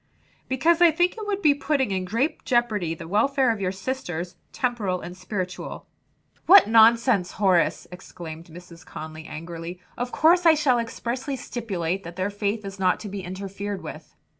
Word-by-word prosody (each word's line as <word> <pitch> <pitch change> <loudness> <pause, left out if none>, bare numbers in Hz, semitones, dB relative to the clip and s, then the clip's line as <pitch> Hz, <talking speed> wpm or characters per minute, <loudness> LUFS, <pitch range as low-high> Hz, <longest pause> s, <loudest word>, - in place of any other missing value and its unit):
"Because 320 +7 +2
I 345 - +8
think 350 +3 +1
it 435 -2 -7
would 405 -1 -2
be 300 -2 +6
putting 280 -5 0
in 185 -1 -1
great 230 - -1
jeopardy 215 - 0
the 165 0 -9
welfare 255 +7 +2
of 220 -3 -4
your 185 -1 0
sisters, 185 -5 -5 0.2
temporal 220 -8 -1
and 180 - -8
spiritual" 185 -1 -5 0.6
"What 390 +3 +9
nonsense, 225 -3 +4
Horace!" 185 -4 +2
exclaimed 170 -3 -9
Mrs. 170 0 -13
Conly 155 0 -9
angrily. 165 +2 -7 0.2
"Of 245 0 -3
course 345 +3 +4
I 320 - +7
shall 270 -5 +2
expressly 245 +4 -3
stipulate 195 -8 -3
that 170 +1 -9
their 185 +2 -2
faith 205 +1 -2
is 195 0 -8
not 185 -1 +2
to 210 - -6
be 195 0 -5
interfered 195 +2 -6
with." - - -10
205 Hz, 165 wpm, -24 LUFS, 180-255 Hz, 0.6 s, What